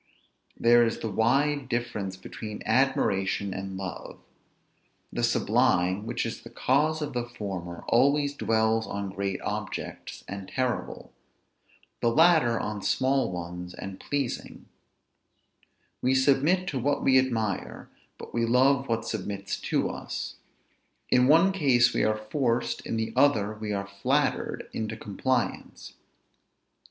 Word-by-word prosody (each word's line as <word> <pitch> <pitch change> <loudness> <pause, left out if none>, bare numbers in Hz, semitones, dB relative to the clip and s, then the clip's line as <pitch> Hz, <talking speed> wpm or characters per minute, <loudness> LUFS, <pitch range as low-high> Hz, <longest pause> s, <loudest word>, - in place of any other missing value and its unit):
There 120 0 +5
is 115 -1 -2
a - - 0
wide 135 +6 +1
difference 120 -6 -3
between 105 +2 -8
admiration 100 -6 +1
and 95 0 -5
love. 95 -4 -6 1.0
The - - -2
sublime, 95 +4 +2
which 120 - -2
is 115 - -5
the 115 - -11
cause 150 +6 +1
of 145 - -5
the 120 -1 -2
former, 95 -7 -6
always 140 +4 +3
dwells 110 -3 +1
on 100 -1 -4
great 100 0 -3
objects, - - -5
and 100 -1 -6
terrible; 130 -2 -3 0.9
the 120 - +2
latter 155 -4 +4
on 105 -1 -4
small 130 0 +1
ones, 90 0 -6
and 95 0 -7
pleasing; 140 -4 -4 1.4
we 130 +1 +2
submit 145 +8 +3
to 135 - -2
what 145 +3 0
we 130 -1 +6
admire, 110 -6 -2 0.3
but - - -10
we 115 - +1
love 130 +3 +3
what 115 0 0
submits 100 -3 -4
to - - 0
us; - - -5 0.7
in 125 0 +5
one 165 +6 +6
case 130 -10 +3
we - - +1
are 110 0 +2
forced, 115 +2 -1
in 115 - -2
the 110 0 -2
other 110 -7 +3
we 105 0 -5
are 100 -1 -2
flattered, 100 0 -1
into 110 0 -3
compliance. 120 +4 -2
115 Hz, 130 wpm, -27 LUFS, 100-135 Hz, 1.4 s, we